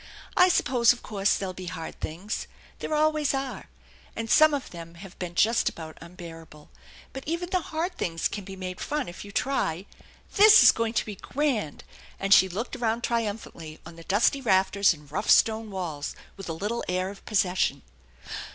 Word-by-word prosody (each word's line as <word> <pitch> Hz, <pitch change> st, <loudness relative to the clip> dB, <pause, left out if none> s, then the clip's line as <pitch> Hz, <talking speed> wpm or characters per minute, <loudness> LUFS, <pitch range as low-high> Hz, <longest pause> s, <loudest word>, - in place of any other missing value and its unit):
I 360 Hz, -1 st, +6 dB
suppose 245 Hz, -8 st, +4 dB
of 245 Hz, -, -13 dB
course 200 Hz, -1 st, +1 dB
there'll 190 Hz, -2 st, -4 dB
be 185 Hz, 0 st, -8 dB
hard 165 Hz, -2 st, -7 dB
things. 180 Hz, +7 st, -5 dB, 0.3 s
There 310 Hz, -, -2 dB
always 305 Hz, -2 st, +2 dB
are, 270 Hz, -1 st, -5 dB, 0.5 s
and 225 Hz, 0 st, -4 dB
some 310 Hz, 0 st, +7 dB
of 285 Hz, -3 st, -3 dB
them 170 Hz, -1 st, -10 dB
have 185 Hz, +2 st, -11 dB
been 175 Hz, -1 st, -5 dB
just 230 Hz, +5 st, +3 dB
about 160 Hz, -1 st, -10 dB
unbearable, 165 Hz, -3 st, -12 dB, 0.4 s
but 270 Hz, -, -7 dB
even 345 Hz, +3 st, -3 dB
the 370 Hz, -2 st, +1 dB
hard 330 Hz, +4 st, -3 dB
things 165 Hz, -1 st, -1 dB
can 205 Hz, -, -6 dB
be 190 Hz, 0 st, -9 dB
made 185 Hz, -1 st, -6 dB
fun 295 Hz, -1 st, -2 dB
if 175 Hz, -, -8 dB
you 205 Hz, -, -10 dB
try. 200 Hz, -8 st, -1 dB, 0.5 s
This 425 Hz, +1 st, +9 dB
is -, -, +9 dB
going 230 Hz, 0 st, -2 dB
to -, -, 0 dB
be 210 Hz, -, -6 dB
grand! 250 Hz, -, -2 dB, 0.2 s
" -, -, -22 dB
and 195 Hz, 0 st, +3 dB
she 190 Hz, -, +6 dB
looked 215 Hz, +9 st, -4 dB
around 235 Hz, -1 st, -1 dB
triumphantly 205 Hz, -9 st, -3 dB
on 165 Hz, 0 st, -11 dB
the 165 Hz, -, -12 dB
dusty 210 Hz, +9 st, +2 dB
rafters 195 Hz, -3 st, +3 dB
and 150 Hz, -4 st, -8 dB
rough 205 Hz, +7 st, -3 dB
stone 220 Hz, 0 st, +4 dB
walls 170 Hz, -7 st, -5 dB, 0.2 s
with 195 Hz, -3 st, -8 dB
a -, -, -2 dB
little 210 Hz, +8 st, -3 dB
air 185 Hz, +1 st, -1 dB
of 200 Hz, -, -14 dB
possession. 180 Hz, -, +1 dB
200 Hz, 190 wpm, -26 LUFS, 175-245 Hz, 0.5 s, This